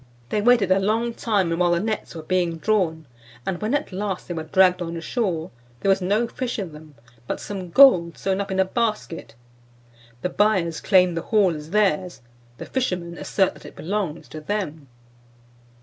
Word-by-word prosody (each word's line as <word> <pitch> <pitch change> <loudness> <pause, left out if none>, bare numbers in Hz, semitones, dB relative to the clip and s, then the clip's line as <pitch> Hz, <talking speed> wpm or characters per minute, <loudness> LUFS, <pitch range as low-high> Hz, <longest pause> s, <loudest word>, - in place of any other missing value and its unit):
They 210 - 0
waited 230 -4 +4
a 190 - +5
long 225 +4 0
time 195 -8 0
while 175 -1 +3
the 170 - +2
nets 215 -2 -3
were 160 - -7
being 175 -1 0
drawn, 165 -5 0 0.4
and 190 -2 -3
when 220 +6 0
at 290 -5 -2
last 190 0 -3
they 175 - -4
were 160 - -3
dragged 180 +3 +3
on 170 -1 -4
shore, 175 -4 -2 0.3
there 195 - +1
was 195 0 +3
no 205 +6 +1
fish 245 +1 -4
in 185 -7 -5
them, 150 -1 -13 0.3
but - - -3
some 190 -3 -6
gold 170 - +6
sewn 195 0 -1
up 200 - -5
in 190 0 -1
a 190 - +4
basket. 210 - -3 0.9
The 180 - 0
buyers 185 -6 +1
claim 185 -3 +4
the 165 - -2
haul 195 -5 +2
as 150 0 -8
theirs, 185 -5 +1 0.4
the - - -7
fishermen 180 -10 -2
assert 190 -2 +1
that - - -16
it - - -13
belongs 185 -3 -3
to 155 - -8
them." 160 -5 -4
185 Hz, 185 wpm, -23 LUFS, 170-210 Hz, 0.9 s, gold